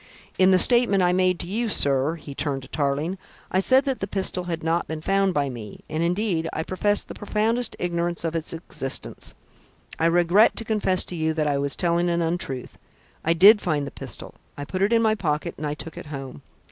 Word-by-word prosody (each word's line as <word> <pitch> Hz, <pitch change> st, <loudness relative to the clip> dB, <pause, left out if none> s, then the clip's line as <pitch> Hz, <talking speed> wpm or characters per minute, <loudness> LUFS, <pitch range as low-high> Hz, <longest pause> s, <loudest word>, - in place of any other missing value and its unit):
"In 185 Hz, 0 st, +6 dB
the 185 Hz, -, +5 dB
statement 230 Hz, -3 st, +5 dB
I 180 Hz, 0 st, +3 dB
made 185 Hz, -1 st, +2 dB
to 170 Hz, -, -6 dB
you, 225 Hz, +5 st, -1 dB
sir," 140 Hz, -3 st, +2 dB
he 145 Hz, -3 st, -10 dB
turned 140 Hz, -1 st, -3 dB
to -, -, -11 dB
Tarling, 150 Hz, +5 st, -2 dB, 0.3 s
"I 185 Hz, -, +2 dB
said 260 Hz, +7 st, +4 dB
that 270 Hz, -2 st, -1 dB
that 195 Hz, -, -4 dB
pistol 190 Hz, -2 st, -1 dB
had 165 Hz, -2 st, -4 dB
not 165 Hz, +1 st, 0 dB
been 160 Hz, 0 st, -5 dB
found 195 Hz, +2 st, +1 dB
by 145 Hz, -1 st, +1 dB
me; 115 Hz, -6 st, -8 dB
and 155 Hz, +1 st, -3 dB
indeed, 170 Hz, -1 st, 0 dB
I 160 Hz, -, -3 dB
professed 205 Hz, +4 st, 0 dB
the -, -, -8 dB
profoundest 220 Hz, +3 st, -1 dB
ignorance 170 Hz, -1 st, 0 dB
of 165 Hz, -1 st, -2 dB
its 160 Hz, -1 st, +1 dB
existence. 160 Hz, -5 st, -3 dB, 0.6 s
I 165 Hz, -, +3 dB
regret 175 Hz, +5 st, +4 dB
to 225 Hz, -, -4 dB
confess 205 Hz, -4 st, +2 dB
to 180 Hz, -, -7 dB
you 160 Hz, -1 st, -1 dB
that 155 Hz, -1 st, 0 dB
I 145 Hz, -1 st, 0 dB
was 140 Hz, -1 st, 0 dB
telling 175 Hz, 0 st, +1 dB
an 170 Hz, 0 st, 0 dB
untruth. 165 Hz, -6 st, -4 dB, 0.4 s
I 165 Hz, -, +2 dB
did 205 Hz, +5 st, +7 dB
find 150 Hz, -6 st, -1 dB
the 140 Hz, -, -7 dB
pistol; -, -, -6 dB, 0.2 s
I 145 Hz, -, -5 dB
put 185 Hz, +4 st, -4 dB
it 200 Hz, +3 st, +2 dB
in 230 Hz, -1 st, +3 dB
my 220 Hz, -1 st, +3 dB
pocket 155 Hz, -8 st, -2 dB
and 150 Hz, -, -3 dB
I 145 Hz, -, -3 dB
took 165 Hz, +1 st, -9 dB
it -, -, -9 dB
home. 135 Hz, -, -8 dB
170 Hz, 220 wpm, -24 LUFS, 155-195 Hz, 0.6 s, did